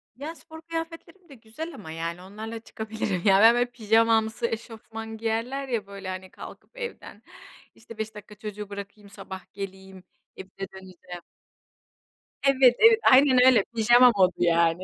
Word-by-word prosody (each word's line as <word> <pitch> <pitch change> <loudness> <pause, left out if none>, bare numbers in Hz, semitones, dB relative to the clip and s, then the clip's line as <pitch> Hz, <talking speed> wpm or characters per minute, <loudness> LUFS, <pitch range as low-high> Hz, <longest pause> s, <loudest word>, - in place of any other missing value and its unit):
Ya, 300 +5 -7
spor 320 -1 -13
kıyafetlerim 330 +2 -8
de 275 - -13
güzel 255 +9 -9
ama, 175 -7 -10
yani, 165 +2 -5
onlarla 220 +4 -8
çıkabilirim. 220 -4 -4
Ya, 195 -1 +5
ben, 230 +2 +8
böyle, 245 0 +2
pijamamsı 225 0 +2
eşofman 225 -1 -7
giyerler 230 +5 -3
ya 225 -5 -3
böyle 200 -1 -8
hani. 185 0 -7
Kalkıp - - -13
evden, 475 -1 -8 0.5
işte, 230 0 -14
"5 220 0 -5
dakika 210 0 -12
çocuğu 210 -1 -8
bırakayım 200 0 -9
sabah 195 -1 -11
geleyim, 190 -1 -9 0.3
evime 190 0 -10 0.2
döneceğim." 185 -2 -11 1.2
Evet, 265 -3 +5
evet, 450 0 +7
aynen 255 -1 +6
öyle. 245 -6 +6
Pijama 240 +2 +6
modu 185 -1 +4
yani. 170 +1 +2
220 Hz, 145 wpm, -25 LUFS, 195-250 Hz, 1.2 s, ben